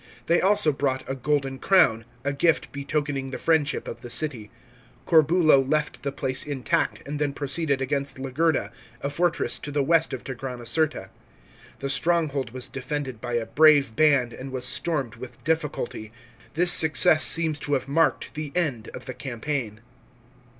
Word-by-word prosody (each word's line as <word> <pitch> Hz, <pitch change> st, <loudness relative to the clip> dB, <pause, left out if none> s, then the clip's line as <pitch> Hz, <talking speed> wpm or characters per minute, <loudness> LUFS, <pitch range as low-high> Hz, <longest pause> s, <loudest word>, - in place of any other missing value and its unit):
They 170 Hz, +5 st, +2 dB
also 200 Hz, -4 st, +4 dB
brought 135 Hz, -1 st, -2 dB
a 135 Hz, -, -2 dB
golden 135 Hz, 0 st, -1 dB
crown, 155 Hz, -, +3 dB, 0.2 s
a 140 Hz, 0 st, -1 dB
gift 160 Hz, +4 st, +1 dB
betokening 140 Hz, -1 st, -3 dB
the 130 Hz, -, -5 dB
friendship 155 Hz, -3 st, 0 dB
of -, -, -7 dB
the 120 Hz, -, -9 dB
city. 120 Hz, -6 st, -3 dB, 0.6 s
Corbulo 160 Hz, -3 st, +5 dB
left 150 Hz, +3 st, -1 dB
the 140 Hz, -, -3 dB
place 130 Hz, -1 st, -2 dB
intact, 140 Hz, -2 st, -2 dB
and 145 Hz, +1 st, -4 dB
then 145 Hz, -2 st, -1 dB
proceeded 140 Hz, 0 st, -1 dB
against 140 Hz, 0 st, -2 dB
Legerda, 135 Hz, -3 st, -1 dB, 0.3 s
a 140 Hz, -, -3 dB
fortress 170 Hz, +3 st, 0 dB
to -, -, -7 dB
the 145 Hz, -1 st, 0 dB
west 165 Hz, +2 st, +2 dB
of 130 Hz, -, -6 dB
Tigranocerta. 125 Hz, -2 st, -2 dB, 0.7 s
The 140 Hz, -, -4 dB
stronghold 145 Hz, -2 st, 0 dB
was 125 Hz, +1 st, -5 dB
defended 130 Hz, -3 st, -5 dB
by 120 Hz, 0 st, -5 dB
a 120 Hz, -1 st, 0 dB
brave 145 Hz, -6 st, +4 dB
band, 140 Hz, -6 st, +3 dB
and 130 Hz, +2 st, -8 dB
was 130 Hz, -1 st, -4 dB
stormed 135 Hz, -3 st, -1 dB
with 130 Hz, -, -11 dB
difficulty. 150 Hz, -8 st, -3 dB, 0.4 s
This 175 Hz, +2 st, +6 dB
success 160 Hz, 0 st, +6 dB
seems 160 Hz, -3 st, +1 dB
to 145 Hz, -, -3 dB
have 130 Hz, -1 st, -1 dB
marked 165 Hz, +4 st, +1 dB
the 150 Hz, -2 st, -6 dB
end 145 Hz, -11 st, -1 dB
of -, -, -9 dB
the 130 Hz, -, -6 dB
campaign. 120 Hz, -4 st, -5 dB
140 Hz, 160 wpm, -25 LUFS, 130-155 Hz, 0.7 s, This